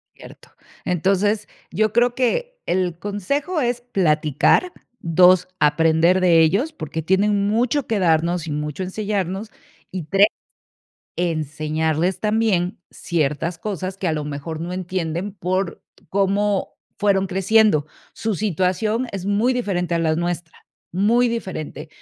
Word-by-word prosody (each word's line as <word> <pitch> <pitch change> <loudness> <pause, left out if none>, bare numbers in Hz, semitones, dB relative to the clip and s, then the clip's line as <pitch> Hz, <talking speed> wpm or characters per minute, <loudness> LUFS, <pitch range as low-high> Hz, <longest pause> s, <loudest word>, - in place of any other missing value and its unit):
Cierto. - - -14 0.4
Entonces, 195 +4 +1 0.2
yo 215 +4 +1
creo 240 0 +3
que - - -1
el 180 -2 0
consejo 280 - -2
es 240 0 -1
platicar. 170 - +2 0.3
2, 180 +2 +4
aprender 160 +4 +3
de 170 -3 +5
ellos, 205 - +2
porque 165 - -5
tienen 200 +3 +2
mucho 240 +6 +1
que 220 -3 0
darnos 170 0 +1
y - - -3
mucho 150 +4 -3
enseñarnos. 200 +1 -3 0.4
Y 185 -2 -4
3, 195 +7 +4 0.9
enseñarles 160 +1 -1
también 210 -5 +1
ciertas 165 +1 -2
cosas 190 -1 -4
que, 190 - -4
a 160 - +1
lo 150 -1 -2
mejor, 150 +2 -5
no 175 +2 -4
entienden 180 +1 -3
por 185 -1 -2 0.3
cómo 200 +1 0 0.2
fueron 195 -2 +2
creciendo. 195 -4 +3 0.3
Su 220 -2 -2
situación 210 +5 0
es 195 -2 -5
muy 210 +5 +2
diferente 180 -8 -1
a - - +1
las 160 -1 +1
nuestra. 175 -1 -3 0.4
Muy 220 +7 +3
diferente. 175 -9 -5
185 Hz, 130 wpm, -21 LUFS, 165-210 Hz, 0.9 s, de